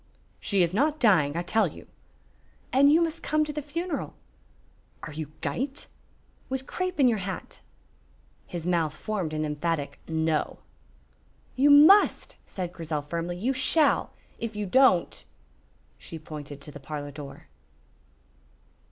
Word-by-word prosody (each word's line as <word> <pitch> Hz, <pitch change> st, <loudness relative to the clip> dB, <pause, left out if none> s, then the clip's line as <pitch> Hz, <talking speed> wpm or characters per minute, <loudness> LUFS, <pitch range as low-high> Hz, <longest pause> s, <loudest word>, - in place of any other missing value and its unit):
"She 195 Hz, -3 st, +2 dB
is 170 Hz, +1 st, 0 dB
not 295 Hz, +8 st, +1 dB
dying, 165 Hz, -, +3 dB
I 170 Hz, -, -1 dB
tell 210 Hz, +3 st, +2 dB
you." -, -, -11 dB, 0.9 s
"And 280 Hz, +2 st, +6 dB
you 330 Hz, +3 st, +5 dB
must 330 Hz, 0 st, -3 dB
come 305 Hz, 0 st, +1 dB
to 300 Hz, -, -5 dB
the 300 Hz, -, -3 dB
funeral." 335 Hz, +5 st, -4 dB, 0.9 s
"Are 155 Hz, -, -7 dB
you 155 Hz, -1 st, -6 dB
gyte?" 265 Hz, -, -3 dB, 0.6 s
"With 265 Hz, 0 st, -2 dB
crape 365 Hz, +1 st, -3 dB
on 270 Hz, -, +6 dB
your 225 Hz, -4 st, +2 dB
hat." 190 Hz, 0 st, -6 dB, 0.9 s
His 170 Hz, -2 st, -6 dB
mouth 165 Hz, -4 st, 0 dB
formed 195 Hz, -4 st, -3 dB
an 155 Hz, 0 st, -2 dB
emphatic 150 Hz, -1 st, -2 dB
"No." 160 Hz, -1 st, 0 dB, 1.0 s
"You 275 Hz, +3 st, +4 dB
must," 310 Hz, +9 st, +6 dB
said 180 Hz, -2 st, -5 dB
Grizel, 155 Hz, -3 st, -4 dB
firmly, 170 Hz, +3 st, -4 dB
"you 245 Hz, +9 st, 0 dB
shall! 275 Hz, +3 st, +2 dB, 0.3 s
If 230 Hz, -2 st, -4 dB
you 210 Hz, 0 st, -2 dB
don't 225 Hz, -4 st, +3 dB, 0.4 s
" 60 Hz, +1 st, -37 dB
She 165 Hz, -, -8 dB
pointed 150 Hz, -2 st, -9 dB
to 150 Hz, -, -10 dB
the 145 Hz, -, -10 dB
parlor 145 Hz, 0 st, -6 dB
door. 140 Hz, -1 st, -10 dB
180 Hz, 145 wpm, -27 LUFS, -, 1.0 s, And